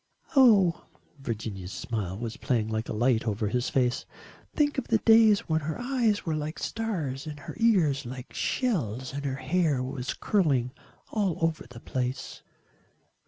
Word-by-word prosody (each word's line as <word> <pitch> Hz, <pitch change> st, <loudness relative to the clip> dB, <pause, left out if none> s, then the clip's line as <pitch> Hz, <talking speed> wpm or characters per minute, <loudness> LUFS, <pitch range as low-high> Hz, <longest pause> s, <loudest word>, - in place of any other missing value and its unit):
"Oh," 210 Hz, -10 st, +5 dB, 0.3 s
Virginia's 105 Hz, -7 st, -5 dB
smile 100 Hz, -6 st, -4 dB
was 115 Hz, 0 st, -5 dB
playing 115 Hz, -5 st, 0 dB
like 110 Hz, +1 st, -2 dB
a -, -, -2 dB
light 115 Hz, +1 st, +2 dB
over 105 Hz, 0 st, 0 dB
his 125 Hz, +3 st, 0 dB
face 125 Hz, -1 st, +1 dB, 0.5 s
"think 290 Hz, -2 st, +2 dB
of 265 Hz, -, -6 dB
the -, -, +3 dB
days 220 Hz, -2 st, +6 dB
when 160 Hz, -1 st, 0 dB
her 155 Hz, +8 st, -4 dB
eyes 245 Hz, -5 st, +1 dB
were 160 Hz, -, 0 dB
like 155 Hz, +1 st, -3 dB
stars 165 Hz, -, -3 dB
and 145 Hz, -1 st, -7 dB
her -, -, -8 dB
ears 180 Hz, -12 st, +3 dB
like 125 Hz, +1 st, -8 dB
shells 130 Hz, -, -1 dB
and 140 Hz, +1 st, -4 dB
her 135 Hz, -1 st, -1 dB
hair 140 Hz, 0 st, +1 dB
was 130 Hz, 0 st, -4 dB
curling 140 Hz, -, +1 dB, 0.4 s
all 200 Hz, -6 st, 0 dB
over 165 Hz, -5 st, 0 dB
the 120 Hz, 0 st, -11 dB
place." 125 Hz, +1 st, -4 dB
140 Hz, 160 wpm, -28 LUFS, 120-195 Hz, 0.5 s, days